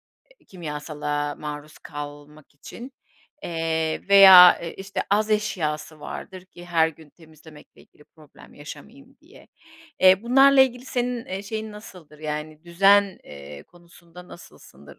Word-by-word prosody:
eee, -, -, -31 dB
kimyasala 150 Hz, -3 st, -5 dB
maruz 150 Hz, 0 st, -9 dB
kalmak 145 Hz, 0 st, -11 dB
için, 240 Hz, -, -12 dB, 0.5 s
eee, 160 Hz, 0 st, -3 dB
veya, 190 Hz, -2 st, +9 dB
iii, 170 Hz, -, -7 dB
işte 195 Hz, +1 st, -5 dB
az 215 Hz, +2 st, +1 dB
eşyası 160 Hz, -8 st, -3 dB
vardır 185 Hz, +4 st, -9 dB
ki 175 Hz, -1 st, -15 dB
her 165 Hz, -2 st, +1 dB
gün 160 Hz, -1 st, -16 dB
temizlemekle 155 Hz, -1 st, -19 dB
ilgili 150 Hz, -, -24 dB
problem 155 Hz, -2 st, -20 dB
yaşamayayım 220 Hz, -, -13 dB
diye. 330 Hz, +8 st, -20 dB, 0.5 s
Eee, 190 Hz, +1 st, +5 dB
bunlarla 270 Hz, +3 st, +5 dB
ilgili 250 Hz, -1 st, +1 dB
senin, 245 Hz, -2 st, -3 dB
eee, 190 Hz, +1 st, -6 dB
şeyin 215 Hz, +1 st, -6 dB
nasıldır, 180 Hz, -8 st, -14 dB
yani 155 Hz, +1 st, -7 dB
düzen, 195 Hz, +3 st, +3 dB
eee, 70 Hz, 0 st, -12 dB
konusunda 175 Hz, -, -18 dB
nasılsındır? 70 Hz, -, -16 dB
170 Hz, 130 wpm, -23 LUFS, 150-205 Hz, 0.5 s, veya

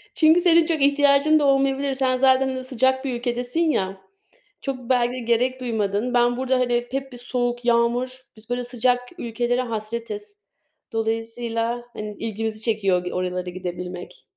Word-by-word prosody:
Çünkü 320 Hz, +1 st, +5 dB
senin 335 Hz, -2 st, +5 dB
çok 320 Hz, -4 st, -1 dB
ihtiyacın 285 Hz, +2 st, +4 dB
da 290 Hz, -, +1 dB
olmayabilir. 275 Hz, 0 st, +2 dB
Sen 260 Hz, -1 st, +1 dB
zaten 260 Hz, 0 st, +3 dB
sıcak 260 Hz, +1 st, +1 dB
bir 260 Hz, -, -1 dB
ülkedesin 245 Hz, +4 st, -2 dB
ya, 195 Hz, -, 0 dB, 0.6 s
çok 255 Hz, -3 st, -5 dB
belki 245 Hz, -1 st, +2 dB
de 255 Hz, -, -4 dB
gerek 245 Hz, +2 st, +1 dB
duymadın. 220 Hz, 0 st, -1 dB
Ben 240 Hz, 0 st, +3 dB
burada 260 Hz, 0 st, +1 dB
hani 240 Hz, -1 st, +1 dB
hep 270 Hz, 0 st, -3 dB
bir 245 Hz, -, -9 dB
soğuk 245 Hz, 0 st, -2 dB
yağmur, 240 Hz, +2 st, +2 dB, 0.3 s
biz 215 Hz, +2 st, -13 dB
böyle 245 Hz, 0 st, -1 dB
sıcak 245 Hz, 0 st, +1 dB, 0.2 s
ülkelere 240 Hz, +1 st, -1 dB
hasretiz. 235 Hz, -, -5 dB, 0.5 s
Dolayısıyla 230 Hz, +1 st, -2 dB
hani 210 Hz, -1 st, -6 dB
ilgimizi 220 Hz, 0 st, -3 dB
çekiyor 195 Hz, -6 st, 0 dB
oralara 180 Hz, 0 st, -2 dB
gidebilmek 180 Hz, 0 st, -7 dB
245 Hz, 145 wpm, -23 LUFS, 225-265 Hz, 0.6 s, Çünkü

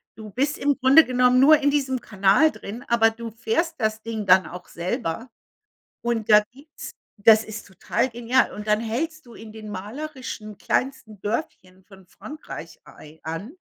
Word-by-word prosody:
Du 215 Hz, -1 st, -10 dB
bist 280 Hz, +7 st, -1 dB
im 285 Hz, 0 st, +1 dB
Grunde 275 Hz, +4 st, +7 dB
genommen 250 Hz, 0 st, +3 dB
nur 300 Hz, +4 st, +7 dB
in 285 Hz, -1 st, +2 dB
diesem 265 Hz, -3 st, 0 dB
Kanal 200 Hz, +10 st, +3 dB
drin, 225 Hz, +5 st, -9 dB
aber 230 Hz, -1 st, +4 dB
du 230 Hz, 0 st, -8 dB
fährst 235 Hz, +9 st, -1 dB
das 220 Hz, -1 st, -1 dB
Ding 220 Hz, -2 st, -4 dB
dann 190 Hz, -, +6 dB
auch 180 Hz, +1 st, -10 dB
selber. 185 Hz, +4 st, -4 dB, 0.7 s
Und 230 Hz, -2 st, -2 dB
da 210 Hz, 0 st, +8 dB
gibt's 280 Hz, +5 st, -11 dB, 0.3 s
das 220 Hz, +1 st, +6 dB
ist 215 Hz, -1 st, -9 dB
total 210 Hz, +6 st, -2 dB
genial. 240 Hz, +2 st, +1 dB
Und 210 Hz, +1 st, -8 dB
dann 210 Hz, 0 st, +3 dB
hältst 305 Hz, +7 st, -4 dB
du 235 Hz, -, -14 dB
in 220 Hz, -1 st, -11 dB
den 215 Hz, -1 st, -10 dB
malerischen 220 Hz, +1 st, -7 dB
kleinsten 225 Hz, -5 st, -3 dB
Dörfchen 190 Hz, -5 st, -5 dB
von 190 Hz, -2 st, -18 dB
Frankreich 300 Hz, -, -10 dB
ei 155 Hz, +1 st, -15 dB
an, 165 Hz, -, -6 dB
230 Hz, 165 wpm, -23 LUFS, 210-260 Hz, 0.7 s, da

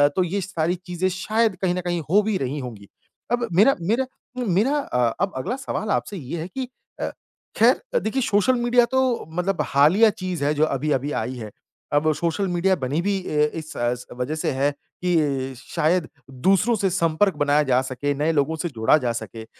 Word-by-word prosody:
तो 185 Hz, -, +3 dB
ये 190 Hz, +3 st, -2 dB
सारी 175 Hz, -2 st, -1 dB
चीज़ें 180 Hz, 0 st, -1 dB
शायद 215 Hz, +3 st, 0 dB
कहीं 185 Hz, -2 st, +2 dB
न 180 Hz, -, -2 dB
कहीं 175 Hz, -1 st, -2 dB
हो 200 Hz, +5 st, +5 dB
भी 215 Hz, -1 st, 0 dB
रही 140 Hz, 0 st, -3 dB
होंगी। 115 Hz, -6 st, -8 dB, 0.4 s
अब 240 Hz, 0 st, +1 dB
मेरा 220 Hz, +9 st, +6 dB
मेरा 225 Hz, +10 st, +1 dB, 0.4 s
मेरा 215 Hz, +11 st, +2 dB
अ, 125 Hz, -, 0 dB
अब 195 Hz, -1 st, 0 dB
अगला 130 Hz, -, -2 dB
सवाल 265 Hz, -5 st, -4 dB
आपसे 205 Hz, -, -1 dB
ये 160 Hz, +2 st, -5 dB
है 165 Hz, -, -4 dB
कि 255 Hz, +7 st, -5 dB, 0.3 s
अ, -, -, -1 dB, 0.5 s
ख़ैर -, -, +3 dB
देखिए 260 Hz, +5 st, -1 dB
सोशल 210 Hz, +2 st, +3 dB
मीडिया 240 Hz, 0 st, +4 dB
तो 260 Hz, 0 st, +3 dB, 0.3 s
मतलब 180 Hz, +3 st, -1 dB
हालिया 165 Hz, +11 st, +5 dB
चीज़ 185 Hz, -6 st, -4 dB
है 150 Hz, -, +2 dB
जो 155 Hz, +1 st, +3 dB
अभी-अभी 145 Hz, -1 st, -1 dB
आई 125 Hz, +4 st, -4 dB
है। 110 Hz, -3 st, -7 dB, 0.4 s
अब 150 Hz, +2 st, +3 dB
सोशल 170 Hz, +5 st, -1 dB
मीडिया 180 Hz, +2 st, +2 dB
बनी 140 Hz, +6 st, 0 dB
भी 200 Hz, +2 st, 0 dB
अ, 150 Hz, 0 st, +2 dB
इस 160 Hz, -1 st, -7 dB, 0.4 s
वज़ह 125 Hz, +5 st, -3 dB
से 155 Hz, -, -1 dB
है 140 Hz, +2 st, +1 dB, 0.3 s
कि 145 Hz, -7 st, +1 dB
शायद 160 Hz, +6 st, 0 dB, 0.4 s
दूसरों 205 Hz, +5 st, +4 dB
से 195 Hz, -2 st, +1 dB
संपर्क 175 Hz, +2 st, +1 dB
बनाया 145 Hz, 0 st, +3 dB
जा 130 Hz, -2 st, +2 dB
सके, 130 Hz, +2 st, -2 dB
नए 150 Hz, +3 st, +1 dB
लोगों 155 Hz, +1 st, +1 dB
से 170 Hz, +2 st, -3 dB
जुड़ा 115 Hz, +1 st, +3 dB
जा 125 Hz, -5 st, -1 dB
सके। 115 Hz, -1 st, -7 dB
170 Hz, 190 wpm, -23 LUFS, 145-200 Hz, 0.5 s, मेरा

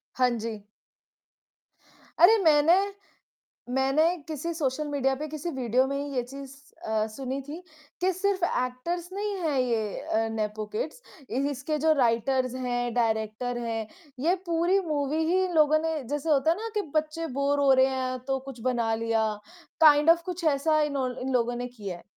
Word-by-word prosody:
हाँ 255 Hz, -1 st, +3 dB
जी। 220 Hz, -1 st, -5 dB, 1.6 s
अरे! 390 Hz, +7 st, +8 dB
मैंने 310 Hz, +1 st, +5 dB, 1.0 s
मैंने 270 Hz, +4 st, +3 dB, 0.2 s
किसी 320 Hz, +2 st, -4 dB
सोशल 300 Hz, -1 st, -2 dB
मीडिया 270 Hz, -2 st, 0 dB
पे 305 Hz, +3 st, -5 dB
किसी 310 Hz, +2 st, -5 dB
वीडियो 255 Hz, -2 st, +1 dB
में 275 Hz, -, -2 dB
ही 285 Hz, -1 st, -4 dB
ये 250 Hz, -, +1 dB
चीज़ 275 Hz, +2 st, -10 dB, 0.3 s
अ, 220 Hz, -1 st, 0 dB
सुनी 260 Hz, +4 st, -5 dB
थी 290 Hz, +5 st, -8 dB, 0.4 s
कि 370 Hz, +1 st, +3 dB
सिर्फ 385 Hz, 0 st, -1 dB
एक्टर्स 335 Hz, +5 st, -2 dB
नहीं 410 Hz, +1 st, -2 dB
हैं 305 Hz, -5 st, 0 dB
ये 230 Hz, -5 st, -1 dB
अ, 225 Hz, +1 st, -1 dB
नेपो 215 Hz, -1 st, -3 dB
किड्स -, -, -4 dB, 0.3 s
इ 250 Hz, -, 0 dB
इसके 285 Hz, +3 st, -3 dB
जो 315 Hz, -, +6 dB
राइटर्स 255 Hz, +2 st, +1 dB
हैं, 245 Hz, -2 st, -2 dB
डायरेक्टर 225 Hz, +1 st, -1 dB
हैं, 225 Hz, -2 st, -3 dB, 0.3 s
ये 335 Hz, +7 st, +2 dB
पूरी 345 Hz, +3 st, +2 dB
मूवी 300 Hz, +1 st, 0 dB
ही 375 Hz, +1 st, +3 dB
इन 360 Hz, -, -4 dB
लोगों 310 Hz, 0 st, +5 dB
ने 320 Hz, -3 st, -2 dB
जैसे 295 Hz, +2 st, -2 dB
होता 295 Hz, +1 st, +4 dB
है 335 Hz, -, 0 dB
ना 450 Hz, +2 st, -5 dB
कि 420 Hz, -, +1 dB
बच्चे 310 Hz, +2 st, -1 dB
बोर 285 Hz, +1 st, +1 dB
हो 280 Hz, -1 st, +4 dB
रहे 260 Hz, 0 st, +5 dB
हैं, 255 Hz, -1 st, -2 dB
तो 270 Hz, 0 st, -1 dB
कुछ 265 Hz, -3 st, -8 dB
बना 235 Hz, -3 st, 0 dB
लिया 225 Hz, -1 st, 0 dB, 0.6 s
काइंड 300 Hz, 0 st, +7 dB
ऑफ 335 Hz, 0 st, +6 dB
कुछ 360 Hz, -1 st, -5 dB
ऐसा 310 Hz, +2 st, +2 dB
इनो 280 Hz, -3 st, 0 dB
इन 265 Hz, +1 st, -2 dB
लोगों 240 Hz, -1 st, +1 dB
ने 245 Hz, +1 st, -4 dB
किया 195 Hz, -4 st, -5 dB
है। -, -, -17 dB
275 Hz, 175 wpm, -27 LUFS, 245-315 Hz, 1.6 s, अरे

